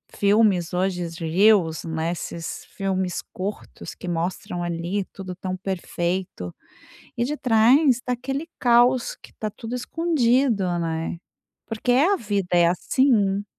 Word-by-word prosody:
filmes 200 -4 +3
hoje 180 -2 -1
de 165 0 -6
Reels, 175 -1 +3
né, 160 0 -2
esses 170 -1 -6
filmes 190 -2 -1
curtos 195 +3 -6
que - - -9
mostram 175 +1 -3
ali 175 +3 -2
tudo 185 -2 -7
tão 185 0 -4
perfeito 180 - -3 0.6
e 235 - +1
detrás 245 -2 +4
está 250 0 +1
aquele 270 +6 -3
caos 245 +1 +4
que - - -16
está 215 - -4
tudo 225 +3 -8
escondido, 250 - +1
né, 165 0 -2 0.5
porque, 225 +2 -1
é, 295 +10 +4
a 400 - +3
vida 205 - -2
é 175 -1 +5
assim. 200 +1 +2
195 Hz, 130 wpm, -24 LUFS, 175-240 Hz, 0.6 s, é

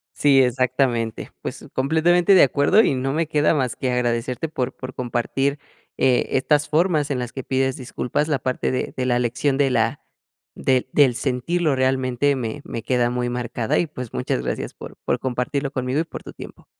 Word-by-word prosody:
Sí, 140 -2 +5
exactamente. 125 -2 0
Pues - - -6
completamente 170 +7 +3
de - - +8
acuerdo 145 - +4
y - - +2
no 130 +1 -1
me 160 +1 0
queda 150 0 +2
más 130 -4 -1
que 130 -1 -2
agradecerte 125 +4 -1
por 130 -4 -3
por 130 0 -8
compartir 125 +4 -1 0.4
eh, 130 -2 +2
estas 150 +2 +2
formas 155 -2 +2
en 135 - -1
las 120 -1 -5
que 135 - -5
pides 130 0 0
disculpas. 130 +3 -2
La 150 -3 +1
parte 130 -1 -1
de 130 - -2
de 125 - -2
la 120 -1 +2
lección 125 +3 0
de 135 -2 +2
la 115 +3 +1 0.5
del 130 -1 +1
del 135 -5 +4
sentirlo 140 +5 0
realmente 130 +1 +1
me 125 +3 -4
me 115 -2 -6
queda 125 -2 +1
muy 125 0 -1
marcada 120 -2 -1
y, 170 - 0
pues, 125 -5 -8
muchas 60 - -1
gracias 65 - -3
por - - -10
por - - 0
compartirlo 130 +2 -2
conmigo 130 +1 -1
y - - +2
por 165 - -9
tu - - -9
tiempo. - - -11
130 Hz, 190 wpm, -22 LUFS, 125-145 Hz, 0.5 s, de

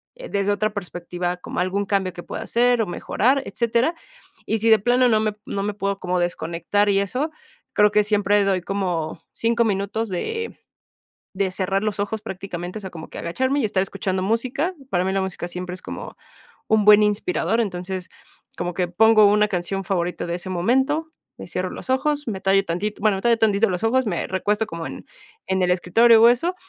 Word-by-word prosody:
eh, - - -9
desde 200 0 0
otra 215 +1 +1
perspectiva 180 -2 -4
como 180 - -6
algún 195 +3 0
cambio 190 -3 0
que 175 - -8
pueda - - -6
hacer 240 0 +2
o - - +1
mejorar, 255 +9 +1
etcétera. 235 +7 0 0.5
Y 220 - 0
si 225 +1 +2
de 220 - +8
plano 245 +3 +3
no 215 -1 +3
me 215 -1 -1
no 200 0 -3
me 210 0 -2
puedo 200 -1 -2
como 180 0 -1
desconectar 175 +4 0
y 195 0 +3
eso, 255 +11 -1 0.4
creo 210 0 +5
que 210 0 +4
siempre 205 -1 +2
doy 195 -2 +1
como 175 -4 -3
5 235 0 +1
minutos 205 +2 -1
de 450 - -4 0.8
de 190 0 0
cerrar 195 +1 -1
los 210 -1 -1
ojos 210 +1 -3
prácticamente, 185 -2 -6
o - - -9
sea, 190 - -6
como 160 -2 -9
que - - -8
agacharme 260 +11 0
y - - 0
estar 190 -2 0
escuchando 190 -1 -2
música. 255 - -1 0.2
Para 180 0 +1
mí 190 - 0
la 195 - +1
música 180 -2 -4
siempre 180 0 -5
es 185 - -10
como - - -8 0.5
un 215 -2 +3
buen 210 0 +8
inspirador, 220 - +1
entonces, 185 -3 -3 0.5
como 175 0 -2
que 180 0 -1
pongo 215 +3 +5
una 210 +1 +4
canción 190 +1 -2
favorita 180 -2 -2
de 170 - -2
ese 180 +1 -7
momento, 265 - +1 0.3
me - - -8
cierro - - -2
los - - -7
ojos, 290 +2 0
me 195 -4 -3
tallo 195 +1 +3
tantito, 195 +4 -3
bueno, 210 -3 +3
me - - -8
tallo 235 -1 +4
tantito 215 -1 +3
los 180 +4 -3
ojos, 255 +2 +2
me 175 -5 -1
recuesto 210 +3 0
como 165 0 -6
en - - -8 0.4
en 190 -1 0
el 180 - +2
escritorio 220 +6 +5
o 230 - +9
eso, 290 +10 +2
200 Hz, 200 wpm, -22 LUFS, 185-225 Hz, 0.8 s, o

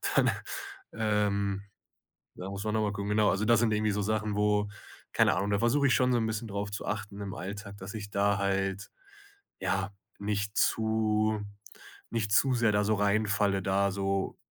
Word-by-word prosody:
dann, - - +5 0.6
ähm, 100 -2 0 0.7
ja, 95 +1 -6
muss 100 +1 -5
man 105 - -1
noch 110 - +2
mal 105 -1 0
gucken, 100 0 -4
genau. 105 0 +4
Also 100 +3 0
das 115 0 +4
sind 115 -2 +2
irgendwie 105 0 +1
so 105 - -1
Sachen, 105 0 -1
wo 105 0 +2 0.4
keine - - +4
Ahnung, 100 +1 0
da 100 - +2
versuche 130 +6 +3
ich - - +4
schon 125 0 +3
so 120 - +3
'n 110 - 0
bisschen 110 +1 -3
drauf 100 0 -3
zu 105 - -5
achten 105 -1 -4
im 100 -1 -5
Alltag, 100 +3 -7
dass 95 +3 -8
ich 105 -2 -6
da 100 0 +2
halt, 95 0 -1 0.7
ja, 95 +1 0 0.3
nicht 100 0 -2
zu 110 -1 +2 0.7
nicht 110 -3 -1
zu 130 +5 +4
sehr 115 -3 +3
da 105 - +3
so 110 +1 +2
reinfalle, 100 -1 +2
da 100 +1 +1
so 95 0 -1
105 Hz, 185 wpm, -30 LUFS, 100-110 Hz, 0.7 s, dann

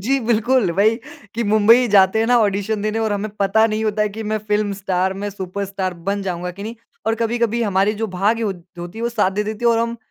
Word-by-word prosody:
जी 270 +8 +1
बिल्कुल 235 -2 +2
वही 215 +5 +3 0.4
कि 235 - -1
मुंबई 230 +4 +5
जाते 195 0 +4
हैं 225 - +2
ना 245 +1 +4
ऑडिशन 205 0 0
देने 215 +1 -1
और 220 -2 0
हमें 205 +1 -2
पता 205 +3 +4
नहीं 220 0 -2
होता 215 0 +1
है 210 - +1
कि 220 +2 -7
मैं 215 - +1
फिल्म 210 -1 +1
स्टार 190 -1 -1
मैं 205 - -2
सुपरस्टार 190 -1 -4
बन 200 0 0
जाऊँगा 180 -1 -3
की - - -6
नहीं 225 +2 -5 0.3
और 225 - +2
कभी-कभी 235 0 0
हमारी 200 0 +1
जो 225 - 0
भाग्य 210 +5 +1
हो 210 -3 0 0.3
होती 175 +6 -7
वो 235 - 0
साथ 215 -5 +1
दे 205 +2 -1
देती 215 +2 -5
है 235 - +5
और 230 - +2
हम 230 0 -1
210 Hz, 240 wpm, -20 LUFS, 195-225 Hz, 0.4 s, मुंबई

